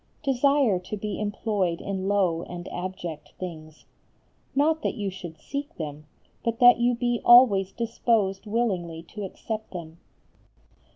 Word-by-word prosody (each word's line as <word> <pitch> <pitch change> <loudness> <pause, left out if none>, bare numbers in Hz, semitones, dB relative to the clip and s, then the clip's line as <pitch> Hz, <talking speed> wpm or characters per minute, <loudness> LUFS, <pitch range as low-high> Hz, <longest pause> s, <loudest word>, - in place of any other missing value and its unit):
Desire 275 -6 +3
to 185 +4 -6
be 210 0 -4
employed 205 -4 -1
in 195 -1 -3
low 190 -5 +2
and 175 0 -7
abject 175 -3 -6
things. 155 -4 -8 0.7
Not 310 +3 +3
that - - -1
you 200 -2 -3
should 175 -3 -9
seek 285 +1 -5
them, 150 -1 -6 0.4
but 230 -1 -1
that 245 0 +7
you 240 +1 +3
be 240 0 0
always 210 -6 +7
disposed 225 -3 0
willingly 185 -8 -1
to 210 - -6
accept 215 +3 -6
them. 165 -2 -8
200 Hz, 135 wpm, -26 LUFS, 175-235 Hz, 0.7 s, that